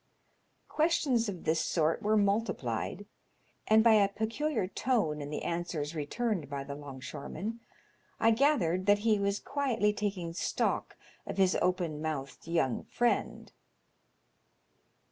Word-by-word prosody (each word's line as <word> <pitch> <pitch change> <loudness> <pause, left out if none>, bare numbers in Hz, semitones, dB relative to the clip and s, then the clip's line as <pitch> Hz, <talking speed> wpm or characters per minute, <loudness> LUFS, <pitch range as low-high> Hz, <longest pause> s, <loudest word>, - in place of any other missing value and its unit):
Questions 300 -8 +1
of 185 -4 -6
this 160 +1 +1
sort 160 0 +1
were 215 +1 +2
multiplied, 205 +3 -1 0.6
and 220 0 +6
by 230 -1 +6
a 205 -2 +5
peculiar 225 +4 -1
tone 185 - 0
in 145 - -5
the 150 - -4
answers 170 -3 -3
returned 165 - -2
by 140 -1 -4
the 140 +1 -6
'longshoreman 145 - -6 0.6
I 225 - +5
gathered 215 - +2
that 205 0 +6
he 215 -2 +4
was 200 0 0
quietly 240 -7 0
taking 195 -5 -3
stock 170 - -1 0.3
of - - -5
his 190 -1 +4
open 175 -4 0
mouthed 155 -2 -4
young 160 -8 0
friend. 240 -1 -1
195 Hz, 125 wpm, -31 LUFS, 160-225 Hz, 0.6 s, and